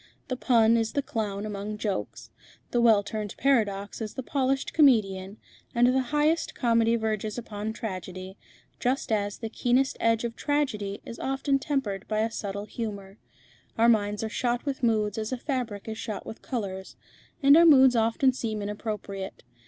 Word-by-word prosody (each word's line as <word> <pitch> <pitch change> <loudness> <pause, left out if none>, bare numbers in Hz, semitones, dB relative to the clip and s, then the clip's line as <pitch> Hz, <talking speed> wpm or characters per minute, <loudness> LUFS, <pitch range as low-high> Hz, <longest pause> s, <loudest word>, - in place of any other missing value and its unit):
The 255 - -1
pun 230 -2 +4
is 225 -1 -1
the 285 - 0
clown 210 -5 -3
among 210 0 -5
jokes, 205 -2 -4 0.4
the 240 - +2
well 220 -3 +5
turned 210 0 -5
paradox 210 -7 +1
is 215 -1 -5
the 260 - -4
polished 270 0 -1
comedian, 205 - +3 0.4
and 240 +1 +5
the 255 +2 +3
highest 300 +2 +1
comedy 230 -1 +3
verges 215 -1 -2
upon 215 -2 -4
tragedy, 185 -3 -6 0.4
just 255 -1 -1
as 205 -2 0
the 225 - -5
keenest 250 +4 +1
edge 230 0 +2
of 235 -1 -3
tragedy 220 -9 -1
is 230 - -8
often 270 +1 0
tempered 265 - -2
by 215 0 0
a 225 +1 0
subtle 200 -1 -4
humour. 205 -3 -6 0.6
Our 230 +1 +5
minds 210 -2 +1
are - - -1
shot 240 +3 -1
with 275 -2 -3
moods 215 -3 +1
as 215 +2 -3
a 255 - -1
fabric 245 -7 -4
is 220 0 -5
shot 215 -3 -5
with 220 - -9
colours, 190 -6 -5 0.5
and 280 +1 +8
our 335 - +7
moods 265 -4 +7
often 230 +4 +3
seem 220 -4 -3
inappropriate. 205 -2 -5
225 Hz, 170 wpm, -27 LUFS, 205-255 Hz, 0.6 s, and